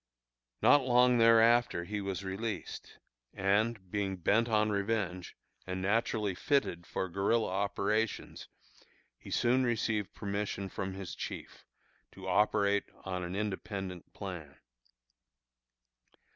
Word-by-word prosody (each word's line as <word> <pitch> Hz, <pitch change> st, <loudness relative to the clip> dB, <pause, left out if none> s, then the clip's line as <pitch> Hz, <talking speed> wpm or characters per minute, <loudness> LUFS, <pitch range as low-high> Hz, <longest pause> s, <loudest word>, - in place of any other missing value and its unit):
Not 145 Hz, -, +7 dB
long 125 Hz, -1 st, +4 dB
thereafter 115 Hz, -3 st, +5 dB
he 105 Hz, +3 st, -4 dB
was 100 Hz, 0 st, -3 dB
released; 105 Hz, +4 st, -5 dB, 0.4 s
and, 100 Hz, 0 st, 0 dB
being 100 Hz, -2 st, -1 dB
bent 110 Hz, +7 st, +2 dB
on 105 Hz, -1 st, +2 dB
revenge, 100 Hz, -3 st, -2 dB, 0.3 s
and 95 Hz, 0 st, -3 dB
naturally 105 Hz, +1 st, 0 dB
fitted 90 Hz, -, 0 dB
for 95 Hz, -, -2 dB
guerilla 100 Hz, +5 st, +1 dB
operations, 100 Hz, +3 st, -1 dB, 0.7 s
he -, -, -12 dB
soon 125 Hz, +2 st, +2 dB
received 110 Hz, -4 st, -1 dB
permission 100 Hz, -1 st, -3 dB
from 95 Hz, +1 st, -4 dB
his 95 Hz, -2 st, -6 dB
chief, -, -, -7 dB, 0.5 s
to 95 Hz, -1 st, -9 dB
operate 100 Hz, +1 st, +2 dB, 0.2 s
on 90 Hz, -1 st, -3 dB
an 90 Hz, +2 st, -4 dB
independent 100 Hz, -3 st, -4 dB
plan. 85 Hz, -8 st, -7 dB
100 Hz, 110 wpm, -32 LUFS, 95-115 Hz, 0.7 s, Not